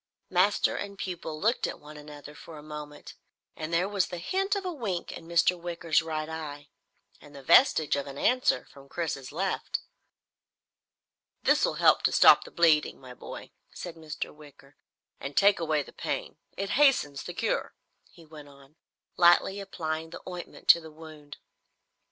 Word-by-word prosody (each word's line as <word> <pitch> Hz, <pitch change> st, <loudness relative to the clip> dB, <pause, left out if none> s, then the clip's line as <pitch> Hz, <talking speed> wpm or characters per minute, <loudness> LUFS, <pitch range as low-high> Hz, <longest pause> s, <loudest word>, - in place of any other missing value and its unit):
Master 185 Hz, +3 st, +2 dB
and 200 Hz, 0 st, -6 dB
pupil 170 Hz, -5 st, -5 dB
looked 225 Hz, +7 st, +1 dB
at -, -, -7 dB
one 150 Hz, +1 st, -13 dB
another 150 Hz, 0 st, -11 dB
for 160 Hz, +1 st, -12 dB
a 150 Hz, -, -11 dB
moment, 150 Hz, -1 st, -9 dB, 0.4 s
and 155 Hz, +1 st, -6 dB
there 170 Hz, +3 st, +2 dB
was 200 Hz, -2 st, 0 dB
the 175 Hz, -, -6 dB
hint 385 Hz, -, -1 dB
of 395 Hz, -1 st, -4 dB
a 360 Hz, -, -2 dB
wink 205 Hz, -, -4 dB
in 165 Hz, -, -10 dB
Mr. 170 Hz, +1 st, +3 dB
Wicker's 170 Hz, -2 st, 0 dB
right 155 Hz, -1 st, -4 dB
eye, 150 Hz, -3 st, -7 dB, 0.5 s
and 145 Hz, -1 st, -15 dB
the 140 Hz, -, -11 dB
vestige 160 Hz, -, +5 dB
of 140 Hz, 0 st, -3 dB
an 140 Hz, 0 st, -8 dB
answer 255 Hz, -, +2 dB
from 140 Hz, 0 st, -17 dB
Chris's 150 Hz, -6 st, -4 dB
left. 185 Hz, +5 st, -2 dB, 1.6 s
"This -, -, +3 dB
will -, -, -2 dB
help -, -, +4 dB
to -, -, +2 dB
stop -, -, +7 dB
the -, -, -10 dB
bleeding, 160 Hz, -3 st, +2 dB
my 130 Hz, -1 st, -11 dB
boy," -, -, -10 dB, 0.2 s
said 175 Hz, -, -7 dB
Mr. 160 Hz, -2 st, -6 dB
Wicker, 145 Hz, -2 st, -17 dB, 0.4 s
"and 140 Hz, 0 st, -7 dB
take 200 Hz, -1 st, +5 dB
away 155 Hz, -3 st, 0 dB
the -, -, -15 dB
pain. -, -, -4 dB, 0.2 s
It 195 Hz, +1 st, -3 dB
hastens 245 Hz, -, +3 dB
the -, -, -8 dB
cure," -, -, -2 dB, 0.3 s
he 165 Hz, -, -17 dB
went 150 Hz, -2 st, -13 dB
on, 140 Hz, +2 st, -19 dB, 0.4 s
lightly 175 Hz, +3 st, +4 dB
applying 160 Hz, -5 st, -4 dB
the 170 Hz, -, -9 dB
ointment 180 Hz, -1 st, -9 dB
to 170 Hz, -, +8 dB
the 160 Hz, -, -11 dB
wound. 155 Hz, -2 st, -12 dB
160 Hz, 170 wpm, -28 LUFS, 150-180 Hz, 1.6 s, to